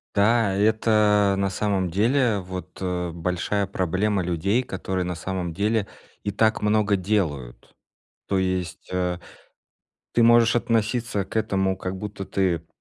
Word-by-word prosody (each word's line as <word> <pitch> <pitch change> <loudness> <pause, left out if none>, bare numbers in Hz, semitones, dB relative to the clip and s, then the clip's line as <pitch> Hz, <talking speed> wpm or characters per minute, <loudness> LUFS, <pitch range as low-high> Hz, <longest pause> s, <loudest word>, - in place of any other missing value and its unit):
Да, 105 -1 +3
и 100 - +1
это 105 -2 +3
на 100 0 +1
самом 95 -1 -1
деле, 115 +3 +2
вот, 95 0 -8
э, 90 -1 -2
большая 90 +4 -1
проблема 95 +1 0
людей, 90 +8 0
которые 95 -4 -3
на 90 -1 -3
самом 90 -2 -4
деле 105 +2 0 0.4
и 100 - -1
так 110 +2 +2
много 105 -1 +2
делают. 90 - -2 0.5
То 100 - 0
есть, 95 -1 -2
э, 90 -1 -1 0.9
ты 120 - +4
можешь 120 0 +5
относиться 115 -2 0
к 95 - -8
этому, 95 -3 +1
как 95 0 -4
будто 100 0 -6
ты, 90 -4 -1
100 Hz, 140 wpm, -24 LUFS, 90-105 Hz, 0.9 s, можешь